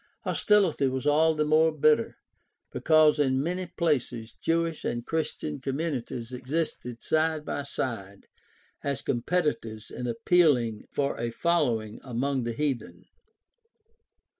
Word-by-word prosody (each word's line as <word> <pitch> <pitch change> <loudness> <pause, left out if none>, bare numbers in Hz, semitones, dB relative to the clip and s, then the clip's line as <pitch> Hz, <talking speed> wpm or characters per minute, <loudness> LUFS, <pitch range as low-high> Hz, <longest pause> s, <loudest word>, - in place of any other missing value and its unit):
Hostility 195 - +2
was 130 +1 -2
all 155 +2 +4
the 150 0 +1
more 155 +1 +4
bitter 155 -5 +2 0.5
because 155 -1 +4
in 130 -2 +2
many 180 +5 -2
places 130 -9 -1
Jewish 165 -1 0
and 120 0 -3
Christian 155 -2 -3
com 135 0 -2
munities 130 -6 -4
existed 125 -2 -3
side 155 -1 +1
by - - -3
side 105 -8 -5 0.6
as 140 -1 -2
competitors 120 -5 -1
in 125 - -5
appealing 120 -3 +2
for 140 -1 -1
a 120 0 -1
following 115 -8 0
among 130 +1 -1
the 120 - -2
heathen. 115 -10 -3
140 Hz, 120 wpm, -27 LUFS, 120-160 Hz, 0.6 s, all